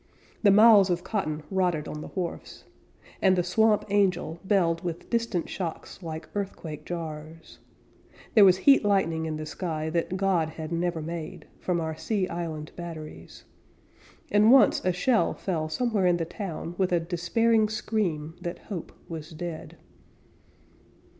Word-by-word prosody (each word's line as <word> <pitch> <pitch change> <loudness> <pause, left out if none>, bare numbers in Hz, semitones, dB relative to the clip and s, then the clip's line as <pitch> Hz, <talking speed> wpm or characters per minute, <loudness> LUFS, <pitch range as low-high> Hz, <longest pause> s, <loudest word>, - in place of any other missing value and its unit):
The 210 - +5
miles 205 -1 +7
of 175 0 0
cotton 155 -8 -2
rotted 180 -5 0
on 150 - -6
the - - -7
wharfs, 180 -3 -6 0.6
And 190 -1 +5
the 180 - +1
Swamp 215 +4 +2
Angel 185 -5 +1
belled 175 -4 +1
with 170 -2 -5
distant 230 -7 0
shocks 175 +1 -6
Like 160 -2 -6
earthquake 165 -7 -5
jars; 160 -1 -7 0.7
There 215 - +7
was 185 -2 +7
heat 275 +6 +5
lightning 165 -6 +1
in 155 -1 -3
the 155 - -5
sky 160 -1 -3
That 170 +2 -1
God 185 -5 +1
had 160 0 -7
never 170 -1 -1
made, 165 -1 -6
From 180 -2 -1
our 160 -1 -3
sea 195 +2 -1
island 160 -3 -5
batteries; 165 -3 -9 0.9
And 210 +2 +5
once 270 0 +6
a 185 - +2
shell 220 +7 +1
fell 160 -5 -2
somewhere 210 +1 +1
in 175 -1 +3
the 165 - -2
town 170 -2 -6
With 185 -1 +1
a 175 - +3
despairing 210 +6 +1
scream 180 -8 -2
that 175 0 -4 0.2
hope 175 - -6 0.2
was 160 -2 -7
dead. 165 0 -7
175 Hz, 150 wpm, -27 LUFS, 160-195 Hz, 0.9 s, miles